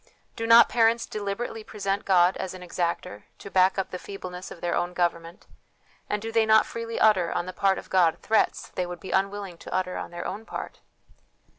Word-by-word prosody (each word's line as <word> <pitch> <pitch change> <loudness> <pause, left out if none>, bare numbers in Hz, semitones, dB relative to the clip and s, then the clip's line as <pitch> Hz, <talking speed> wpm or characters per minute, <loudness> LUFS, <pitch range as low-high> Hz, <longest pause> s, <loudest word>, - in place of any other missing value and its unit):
Do 225 -1 -3
not 230 +1 +8
parents 230 0 +3
deliberately 215 +2 -4
present 200 -2 -3
God 180 -1 +4
as 185 0 -5
an 180 - -10
exactor, 170 - -3
to 200 - -10
back 185 +1 +4
up 195 - -2
the 180 - -5
feebleness 185 -2 -8
of - - -10
their 175 0 -2
own 175 0 -1
government; 170 0 -2 0.6
and 210 - 0
do 225 +2 -5
they 225 0 +3
not 220 0 +6
freely 230 0 -5
utter, 190 -6 +4
on 175 - -1
the 185 - -6
part 195 0 +2
of - - -9
God, 175 -4 +4
threats 220 - +1
they 180 - -3
would 175 -1 -7
be 190 - -8
unwilling 195 -2 -1
to - - -10
utter 185 -1 -1
on - - -5
their 175 0 -7
own 210 +3 -5
part - - -7
190 Hz, 205 wpm, -26 LUFS, 180-215 Hz, 0.6 s, not